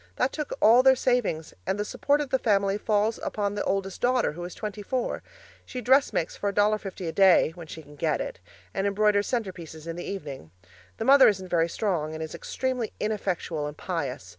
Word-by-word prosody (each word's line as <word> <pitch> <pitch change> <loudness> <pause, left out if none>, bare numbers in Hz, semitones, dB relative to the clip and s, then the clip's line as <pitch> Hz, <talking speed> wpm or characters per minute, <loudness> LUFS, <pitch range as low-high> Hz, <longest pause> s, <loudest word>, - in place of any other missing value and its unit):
That 265 - 0
took 300 -2 -4
all 230 +4 +7
their 265 0 +6
savings, 245 -12 0
and 195 - 0
the 210 - -2
support 290 +6 +1
of 285 - -5
the 265 - +2
family 200 -4 +2
falls 215 +1 +1
upon 205 -1 -2
the 205 - -2
oldest 195 -1 -2
daughter, 250 0 +2
who 175 +3 -8
is 180 - -8
twenty 210 -1 -5
four. 250 +4 -2 0.4
She 255 - -6
dressmakes 255 - +2
for 200 - -1
$1.50 205 -3 0
a - - -1
day 185 -2 +5
(when 170 -2 -10
she 160 +1 -9
can 145 0 -15
get 155 0 0
it) - - -5 0.3
and 195 +1 0
embroiders 205 0 +2
centrepieces 180 -9 -4
in 165 0 -5
the 175 - -5
evening. 145 - -6 0.5
The - - -3
mother 275 0 +8
isn't 190 -3 0
very 170 -1 +2
strong 165 -5 -2
and 160 - -4
is 160 - -7
extremely 255 -4 -3
ineffectual 180 -7 -2
and 150 - -8
pious. 140 - -4
200 Hz, 200 wpm, -26 LUFS, 165-225 Hz, 0.5 s, mother